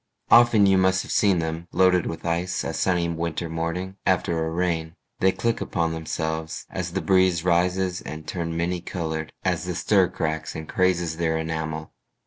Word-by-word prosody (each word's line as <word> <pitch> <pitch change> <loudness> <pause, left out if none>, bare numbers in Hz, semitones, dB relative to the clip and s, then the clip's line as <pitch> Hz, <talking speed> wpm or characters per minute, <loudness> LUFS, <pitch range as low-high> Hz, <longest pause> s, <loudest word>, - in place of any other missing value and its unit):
Often 120 -3 +7
you 95 -1 +4
must 95 0 +3
have - - -8
seen 100 -3 +3
them 80 +1 -3
Loaded 90 -1 +3
with 80 - -6
ice 85 +2 -1
a - - -3
sunny 90 -2 +1
winter 85 0 -3
morning 85 +4 -3
After 85 -3 +1
a - - -2
rain. 85 -1 -1 0.2
They 95 - +4
click 115 +5 -1
upon 85 -3 -1
themselves 80 0 -3
As 90 -2 -4
the 95 - -1
breeze 95 -3 +3
rises, 90 +1 +1
and 80 0 -8
turn 85 -2 -3
many 85 +1 -1
colored 80 -4 -4
As - - 0
the - - -3
stir - - +3
cracks 80 0 -3
and 80 0 -6
crazes 90 -3 +1
their 80 -1 0
enamel. 80 -1 -4
85 Hz, 175 wpm, -24 LUFS, 80-95 Hz, 0.2 s, Often